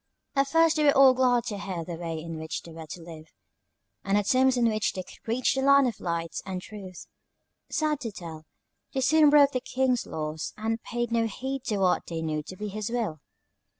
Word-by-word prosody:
"At 275 0 +3
first 325 +2 +3
they 305 - +2
were 285 -2 +5
all 270 -1 +8
glad 250 -2 +3
to 210 -4 -4
hear 180 -4 -4
the 175 - -6
way 165 -1 -4
in 165 0 -6
which 160 0 -5
they 170 - -11
were 160 -1 -9
to 170 +2 -8
live, 160 -2 -11 0.8
and 200 +1 +2
the 205 - +2
terms 255 +4 +3
on 235 -1 +3
which 215 -1 0
they 185 - -4
could - - -17
reach 240 +3 +1
the 265 - -1
Land 280 0 +5
of 230 - -4
Light 170 -1 -3
and 190 -1 -4
Truth. 190 -2 -10 0.6
Sad 305 -2 0
to 235 -5 -5
tell, 160 -5 -9 0.5
they 265 - +1
soon 305 +3 +5
broke 285 -1 +6
the 255 - -2
King's 255 -1 0
laws, 155 0 -4
and 225 +1 -2
paid 240 0 -3
no 230 -1 +2
heed 265 +4 -4
to 215 -4 -1
what 185 -2 +1
they 165 -1 -4
knew 155 -1 -1
to 185 +5 -10
be 210 +1 -4
his 210 +1 -4
will. 225 -10 -2
215 Hz, 220 wpm, -27 LUFS, 170-260 Hz, 0.8 s, all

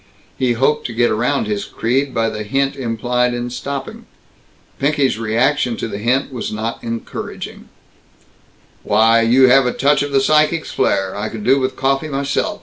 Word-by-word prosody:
He 125 -2 +1
hoped 135 +5 +1
to 120 - -8
get 120 0 +2
around 125 +4 0
his 105 -1 -2
creed 135 +4 -1
by 115 -2 0
the 110 0 -5
hint 135 +6 -1
implied 125 0 -1
in 120 0 -4
stopping. 135 +2 -6 0.7
Pinky's 140 -4 +1
reaction 115 +2 +1
to - - -3
the 100 -2 -6
hint 130 +5 0
was 120 - -4
not 110 +2 -4
encouraging: 115 0 -6 1.1
"Why, 115 +2 +4
you 125 +3 +5
have 135 0 +5
a - - +1
touch 145 +2 +2
of 145 0 -2
the 135 - +3
psychic's 155 +3 +2
flare! 95 0 0
I 105 +2 -3
could 110 -2 -7
do 135 +4 +4
with 130 0 -2
coffee 135 +3 0
myself. 140 -1 -2
125 Hz, 170 wpm, -18 LUFS, 115-135 Hz, 1.1 s, you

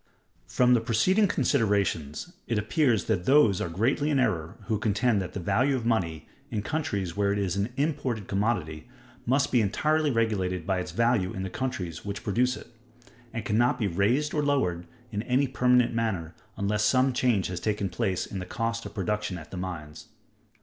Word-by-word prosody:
_ - - -16
From 125 0 +4
the 120 - +4
preceding 185 - +3
considerations, 100 - 0
it 115 - 0
appears 115 - +2
that 95 -5 -1
those 130 -9 +5
are - - -2
greatly 120 - +1
in 145 - +2
error 80 -10 -1
who 110 -3 -1
contend 110 0 +1
that 90 -1 -6
the - - -4
value 130 +10 +2
of 120 -3 -3
money, 85 -9 -1 0.2
in 110 -5 -3
countries 100 - -2
where 100 -1 +1
it 100 - 0
is 95 -3 -1
an 100 +4 -1
imported 135 - -1
commodity, 95 -7 -1 0.4
must 135 +2 +2
be 125 - +4
entirely 155 +9 +1
regulated 100 - 0
by 95 0 0
its 90 - -4
value 115 -5 +1
in 95 - -4
the 95 - -5
countries 90 -11 -4
which 100 -1 -5
produce 125 +5 +1
it; 120 - -13 0.6
and 115 -3 -5
can 105 +1 +1
not 120 +1 +3
be 110 - -1
raised 105 - +1
or 150 - +1
lowered 90 -13 0 0.2
in 105 -1 -2
any 125 +4 +1
permanent 125 -1 +3
manner 100 -8 -2 0.2
unless 105 +1 0
some 130 +5 +3
change 120 -6 +2
has 90 -1 -3
taken 105 +1 -1
place 95 -1 -1
in 95 - -6
the 90 - -5
cost 115 0 -2
of - - -14
production 105 -1 -2
at 80 -1 -11
the - - -6
mines. 85 -5 -6
110 Hz, 190 wpm, -27 LUFS, 95-125 Hz, 0.6 s, those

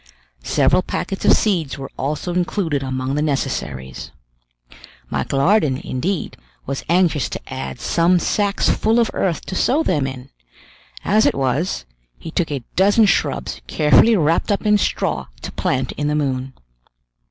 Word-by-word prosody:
Several - - +3
packets 195 - -4
of - - +7
seeds 170 -11 0
were 135 -1 -7
also 150 +5 -3
included 175 -4 -1
among 130 0 -3
the 150 - 0
necessaries. 65 - -3 1.0
Michel 140 - -1
Ardan, 155 -4 +3
indeed, 170 +8 -3 0.3
was 140 0 -4
anxious 170 -5 +2
to - - -7
add 130 -1 -5
some 170 +7 +2
sacks 200 +3 0
full 220 +2 +2
of 230 - +2
earth 170 -6 -1
to - - -6
sow 280 - +2
them 145 - +1
in; 130 0 -8 0.7
as 215 +2 +4
it - - +1
was, 135 - -1 0.3
he 165 - -8
took 170 0 -1
a 140 -4 -4
dozen 205 +4 +5
shrubs 200 - 0
carefully 150 - +4
wrapped 165 +5 +1
up 205 - -1
in 210 0 +4
straw - - -1 0.2
to - - -5
plant 130 -1 -1
in 145 - -3
the 150 - 0
moon. 135 -3 -2
155 Hz, 155 wpm, -20 LUFS, 135-190 Hz, 1.0 s, of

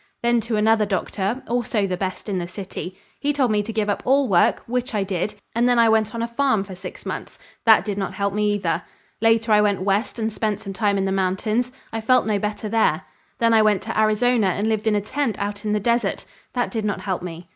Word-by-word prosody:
Then 235 0 +3
to 225 0 -2
another 215 0 +3
doctor 200 +4 -2
also 230 -3 0
the 185 -2 -1
best 185 +3 -4
in 195 -3 -1
the 175 - -4
city. 185 -1 -7 0.2
He 290 - +1
told 270 -5 +1
me 210 -1 +2
to 215 +2 -5
give 215 -1 -1
up 205 - -1
all 270 +1 +3
work, 175 -4 +3
which 250 -1 -2
I 205 - +1
did, 195 +2 -2 0.2
and 240 +2 +2
then 245 - +3
I 230 -1 +5
went 220 0 +2
on 230 - -2
a - - -1
farm 235 -4 +1
for 195 -1 -9
six 185 0 -9
months. - - -6 0.3
That 220 -1 +7
did 205 -2 -3
not 195 - -3
help 200 -1 -1
me 210 0 +1
either. 175 -4 -1 0.4
Later 225 0 +3
I 210 0 +6
went 205 -3 +1
west 200 +5 0
and 220 -1 -2
spent 215 -2 -1
some 200 -3 -7
time 200 +1 +1
in 195 - 0
the 190 - 0
mountains. 195 +6 0 0.2
I 225 - -2
felt 255 +3 +3
no 210 -2 +1
better 210 +1 -3
there. 225 +1 +2 0.3
Then 230 -1 +3
I 220 - +6
went 210 -2 +2
to 225 -1 -2
Arizona 220 +1 +3
and 200 +4 0
lived 220 0 0
in 215 - +3
a 205 - +1
tent 250 0 -2
out 205 +1 -4
on - - 0
the 210 - +1
desert; 235 -1 0 0.3
that 245 -1 -1
did 225 -3 -2
not 205 -1 -2
help 190 -3 -2
me. 170 -1 -8
215 Hz, 245 wpm, -22 LUFS, 200-230 Hz, 0.4 s, That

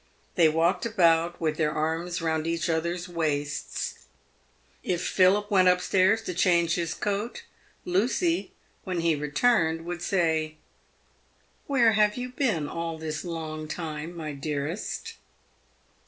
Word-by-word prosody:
They 165 -4 +5
walked 165 +4 +1
about 170 -6 +2
with 155 -2 -1
their 155 -2 +1
arms 165 +3 -2
round 160 -1 0
each 165 0 0
other's 170 +3 -2
waists. 150 -4 -3 0.7
If 180 0 -2
Philip 200 +3 +3
went 185 -2 +5
up 180 0 +5
stairs 190 +4 +2
to 180 - -4
change 170 -2 +3
his 170 -2 -2
coat, 205 +3 -3 0.4
Lucy, 255 - +1 0.3
when 180 -3 -2
he 165 -1 +3
returned, 160 +2 +1
would 175 0 -5
say, 160 -5 0 0.6
" - - -38
Where 245 -5 +4
have 210 0 +3
you 250 0 -4
been 230 - 0
all 165 0 -4
this 155 -1 -4
long 160 -3 -5
time, 160 +1 -5
my 155 -2 -5
dearest 145 +5 -4
170 Hz, 135 wpm, -27 LUFS, 160-190 Hz, 0.7 s, They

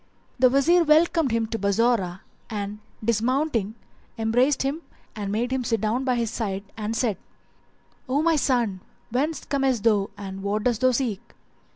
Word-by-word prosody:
The 255 0 +6
Wazir 325 +7 +4
welcomed 315 -2 +3
him 230 0 +1
to 225 - -3
Bassorah 200 -3 +1 0.3
and 205 -1 -4 0.3
dismounting, 235 -1 0 0.4
embraced 245 +6 +2
him 280 +4 -2 0.3
and 205 -2 -4
made 235 +4 -1
him 260 -1 0
sit 225 -1 0
down 225 +6 -1
by 255 -2 +2
his 235 -2 -1
side 195 -4 -3
and 220 +1 -3
said, 225 -6 0 0.9
"O 285 +4 +1
my 330 0 +3
son, 240 -9 +1 0.3
whence 295 +6 -1
comest 270 -5 0
thou 210 -4 +3
and 195 -1 -7
what 205 +2 -1
dost 240 -1 0
thou 255 - +5
seek?" 240 -5 -1
230 Hz, 160 wpm, -25 LUFS, 210-265 Hz, 0.9 s, The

